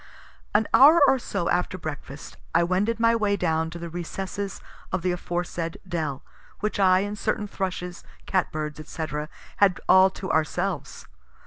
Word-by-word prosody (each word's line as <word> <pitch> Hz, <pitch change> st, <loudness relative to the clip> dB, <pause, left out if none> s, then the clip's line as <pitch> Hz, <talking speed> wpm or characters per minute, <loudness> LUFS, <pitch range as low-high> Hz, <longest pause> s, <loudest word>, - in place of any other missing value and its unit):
An 220 Hz, +1 st, +4 dB
hour 305 Hz, +5 st, +8 dB
or 270 Hz, -1 st, +4 dB
so 170 Hz, -7 st, -3 dB
after 180 Hz, +1 st, 0 dB
breakfast 145 Hz, -4 st, -7 dB, 0.2 s
I 170 Hz, -, +5 dB
wended 200 Hz, +6 st, 0 dB
my 230 Hz, 0 st, +4 dB
way 205 Hz, -3 st, +1 dB
down 160 Hz, -2 st, 0 dB
to 170 Hz, -, -8 dB
the 170 Hz, 0 st, -6 dB
recesses 190 Hz, +3 st, -5 dB, 0.3 s
of 180 Hz, -2 st, -1 dB
the 180 Hz, -, +1 dB
aforesaid 175 Hz, -1 st, -3 dB
dell, 155 Hz, -6 st, -3 dB, 0.4 s
which 215 Hz, -1 st, -2 dB
I 185 Hz, -1 st, +5 dB
and 205 Hz, +1 st, -3 dB
certain 210 Hz, 0 st, -1 dB
thrushes, 180 Hz, -3 st, -4 dB, 0.2 s
cat 185 Hz, -2 st, 0 dB
birds, 150 Hz, -1 st, -4 dB
&c., 160 Hz, -, -3 dB, 0.5 s
had 195 Hz, -3 st, +4 dB
all 190 Hz, 0 st, +7 dB
to 190 Hz, 0 st, -5 dB
ourselves. 175 Hz, +3 st, -1 dB
180 Hz, 155 wpm, -25 LUFS, 170-200 Hz, 0.5 s, hour